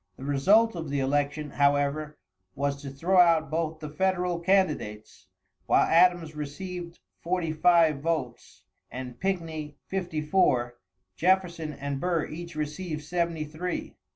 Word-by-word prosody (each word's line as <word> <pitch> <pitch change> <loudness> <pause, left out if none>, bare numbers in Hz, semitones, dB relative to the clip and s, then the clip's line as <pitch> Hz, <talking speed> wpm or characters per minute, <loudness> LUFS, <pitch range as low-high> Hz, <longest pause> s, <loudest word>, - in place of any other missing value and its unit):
The - - -10
result 190 +11 +3
of 165 -3 -5
the 140 0 -1
election, 145 +2 -1
however, 145 +2 +1 0.4
was 140 0 -2
to 140 - -6
throw 170 +8 +1
out 165 -3 +4
both 160 -1 -2
the 155 - -5
federal 180 0 0
candidates, 170 - 0 0.4
while - - +5
Adams 170 -2 +3
receiving 170 +4 -6 0.2
forty 175 -2 -1
five 165 -2 +4
votes 155 -6 -3 0.3
and 125 -1 -7
Pickney 165 -6 -3
fifty 180 -4 -3
four; 125 -8 +1 0.4
Jefferson 175 -3 +1
and 140 -1 -4
Burr 170 0 0
each 170 +2 -8
received 155 +1 -4
seventy 170 -1 -1
three. 165 +4 -5
160 Hz, 130 wpm, -27 LUFS, 145-180 Hz, 0.4 s, while